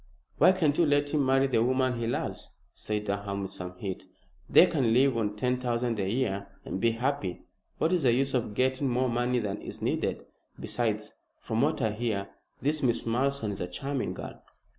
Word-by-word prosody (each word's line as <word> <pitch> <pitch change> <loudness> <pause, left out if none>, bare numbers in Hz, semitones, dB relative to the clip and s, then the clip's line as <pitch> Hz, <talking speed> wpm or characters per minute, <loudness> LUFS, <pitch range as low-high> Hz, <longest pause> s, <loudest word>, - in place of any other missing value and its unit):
"Why - - +8
can't 160 -6 +2
you 170 - +5
let 145 0 +2
him 150 -2 +3
marry 135 +1 +4
the 125 -4 +2
woman 130 -1 +1
he 115 - -1
loves?" 120 - -4 0.2
said 105 -1 -3
Durham, 100 0 -2
with 95 - -5
some 90 0 -7
heat. 95 -1 -5 0.4
"They - - +8
can 135 -10 +1
live 130 +1 +4
on 105 -2 -1
ten 125 +3 0
thousand 120 -2 -1
a 95 -1 0
year 100 -4 -1 0.2
and 95 - -4
be 115 -1 +3
happy. 120 -6 -2 0.3
What 165 - +1
is 180 - +2
the 130 -4 +4
use 135 +3 +1
of 115 -5 -1
getting 130 +2 +1
more 125 +1 +1
money 120 +1 +1
than 105 -3 -2
is - - -7
needed? - - -1 0.3
Besides, - - -1 0.3
from 110 0 -1
what 150 -1 +1
I 110 - +2
hear, 105 -3 -2 0.3
this 150 +2 +1
Miss 120 -4 +1
Malleson 125 -1 0
is 100 - -6
a 90 - -2
charming 135 +9 -3
girl." - - -8
120 Hz, 200 wpm, -29 LUFS, 105-135 Hz, 0.4 s, Why